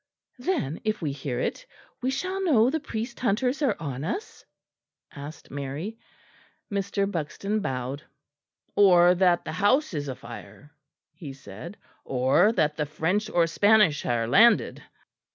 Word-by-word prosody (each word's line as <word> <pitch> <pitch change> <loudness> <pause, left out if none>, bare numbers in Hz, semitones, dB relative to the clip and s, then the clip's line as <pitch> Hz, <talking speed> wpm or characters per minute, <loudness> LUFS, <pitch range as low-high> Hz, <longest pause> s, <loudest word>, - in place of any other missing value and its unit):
"Then, 250 - -2
if 215 -1 -1
we 150 - 0
hear 135 -3 -4
it, - - -2 0.4
we 255 - 0
shall 370 +8 -2
know 255 -8 +4
the 320 - -1
priest 235 -4 -5
hunters 250 +5 0
are 255 -8 +2
on 140 -4 -5
us?" 385 - -5 0.7
asked 145 +2 -10
Mary. 145 +11 -5 0.7
Mr. 200 0 -1
Buxton 195 +5 -2
bowed. 130 -3 -3 0.7
"Or 180 -3 +6
that 180 -1 +2
the - - -4
house 255 +6 +2
is 145 -2 -3
afire," 120 +1 -9 0.4
he 155 -4 -9
said, 135 - -10 0.3
"or 135 - +3
that 150 -7 +1
the 150 - -1
French 180 +8 -1
or 175 -5 +3
Spanish 205 -1 +3
are 115 -1 0
landed." 225 - +4
180 Hz, 135 wpm, -26 LUFS, 140-220 Hz, 0.7 s, Or